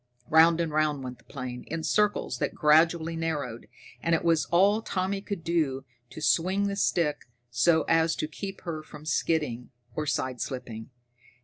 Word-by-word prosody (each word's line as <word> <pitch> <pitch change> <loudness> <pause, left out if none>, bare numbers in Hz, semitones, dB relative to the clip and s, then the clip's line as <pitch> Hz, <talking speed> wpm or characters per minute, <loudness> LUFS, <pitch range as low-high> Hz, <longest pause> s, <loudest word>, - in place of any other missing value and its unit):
Round 165 +1 +6
and 165 -2 -1
round 150 -2 0
went 125 -1 -7
the - - -22
plane, 125 -3 -6
in 165 0 -4
circles 210 +6 +1
that - - -2
gradually 160 +2 +3
narrowed, 150 -8 -3 0.3
and 165 0 +2
it - - -2
was 165 -3 +3
all 200 +5 +3
Tommy 195 -1 -2
could 200 -4 -5
do 150 -6 0 0.2
to - - -9
swing 190 +6 +2
the 200 - -2
stick 160 -8 0 0.2
so 160 +7 +3
as 165 0 +2
to 155 - -2
keep 195 +4 -7
her 165 -3 -5
from 150 0 -12
skidding 150 -6 -1 0.2
or 155 +3 -3
sideslipping. 125 -4 -3
160 Hz, 165 wpm, -27 LUFS, 145-170 Hz, 0.3 s, Round